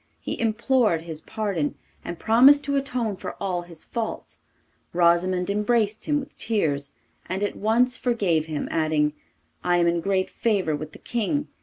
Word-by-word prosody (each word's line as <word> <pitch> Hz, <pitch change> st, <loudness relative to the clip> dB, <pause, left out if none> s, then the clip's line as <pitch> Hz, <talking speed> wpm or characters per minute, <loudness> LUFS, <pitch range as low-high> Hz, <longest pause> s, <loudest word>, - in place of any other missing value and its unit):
He -, -, -5 dB
implored 225 Hz, -5 st, +2 dB
his 160 Hz, -2 st, -7 dB
pardon, 195 Hz, -9 st, -2 dB, 0.3 s
and 175 Hz, -, -5 dB
promised 260 Hz, -, +6 dB
to 280 Hz, 0 st, -1 dB
atone 250 Hz, -7 st, -1 dB
for -, -, -6 dB
all 180 Hz, -2 st, -2 dB
his 170 Hz, -2 st, -10 dB
faults. 230 Hz, -2 st, -5 dB, 0.5 s
Rosimond 180 Hz, +2 st, +2 dB
embraced 210 Hz, 0 st, +1 dB
him 295 Hz, -1 st, +1 dB
with 275 Hz, -, -10 dB
tears, 145 Hz, -11 st, 0 dB, 0.3 s
and 190 Hz, +3 st, -2 dB
at 205 Hz, -, -1 dB
once 245 Hz, +4 st, +2 dB
forgave 190 Hz, -10 st, +1 dB
him, 155 Hz, -2 st, -3 dB
adding, 155 Hz, -2 st, +1 dB, 0.5 s
'I 175 Hz, 0 st, +3 dB
am 175 Hz, -, +3 dB
in 170 Hz, 0 st, +1 dB
great 190 Hz, 0 st, 0 dB
favour 195 Hz, -9 st, 0 dB
with 155 Hz, +1 st, -7 dB
the -, -, -10 dB
King. 240 Hz, +6 st, -2 dB
200 Hz, 160 wpm, -25 LUFS, 170-235 Hz, 0.5 s, promised